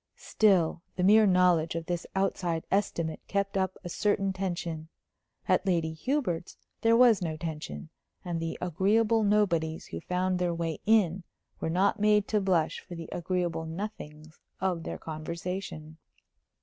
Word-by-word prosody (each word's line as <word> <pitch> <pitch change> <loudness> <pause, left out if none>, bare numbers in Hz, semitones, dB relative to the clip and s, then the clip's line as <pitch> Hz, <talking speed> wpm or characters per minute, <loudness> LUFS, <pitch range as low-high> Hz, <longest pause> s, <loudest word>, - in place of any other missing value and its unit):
Still, 185 -6 +2
the 180 - -1
mere 210 +3 +6
knowledge 180 -3 +3
of 165 -1 -3
this 175 0 -3
outside 180 -4 0
estimate 170 -5 0
kept 200 0 -1
up 190 -1 0
a 175 - -5
certain 195 +1 0
tension. 170 -4 -4 0.6
At - - +3
Lady 165 -3 +1
Hubert's 180 - -2 0.2
there 230 0 +4
was 235 -5 +6
no 160 -3 -2
tension, 150 - -6 0.4
and 175 -2 -2
the 165 0 -3
agreeable 210 +6 +2
nobodies 185 -7 +1
who 80 - -7
found 180 0 -1
their 175 -1 0
way 165 -2 -3
in 195 -5 +3 0.4
were - - -2
not 195 +5 +2
made 210 -1 +3
to 210 -2 +2
blush 180 -5 +1
for 180 - -10
the 165 -1 -8
agreeable 175 -2 -2
nothings 160 -4 -7 0.2
of 180 -3 0
their - - -5
conversation. 160 0 -6
180 Hz, 150 wpm, -29 LUFS, 165-195 Hz, 0.6 s, mere